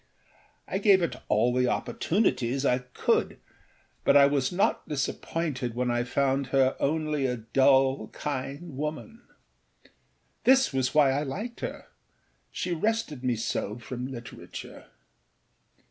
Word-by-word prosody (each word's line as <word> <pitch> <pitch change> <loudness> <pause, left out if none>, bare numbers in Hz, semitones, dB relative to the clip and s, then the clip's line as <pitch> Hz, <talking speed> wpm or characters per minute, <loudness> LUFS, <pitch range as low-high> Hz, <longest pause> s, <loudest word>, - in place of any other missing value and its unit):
I 190 - -2
gave 195 -3 +5
it 170 - -2
all 115 +3 +2
the 125 0 +2
opportunities 135 - 0
I 125 -1 +3
could, 125 0 0 0.7
but - - +5
I 140 - +8
was 140 -2 +1
not 180 +3 0
disappointed 140 -3 -2
when 125 0 0
I 120 0 +1
found 135 +1 0
her 135 0 +2
only 150 -2 0
a 125 -1 -2
dull, 135 +3 +3
kind 140 +2 -5
woman. 155 - -5 1.2
This 265 - +4
was 130 +1 0
why 145 -3 +6
I 140 +2 0
liked 205 - -5
herâshe 175 -3 -7
rested 215 - -1
me 125 -2 +1
so 110 -1 -3
from 125 +1 -6
literature. 120 -3 -9
135 Hz, 125 wpm, -27 LUFS, 125-155 Hz, 1.2 s, I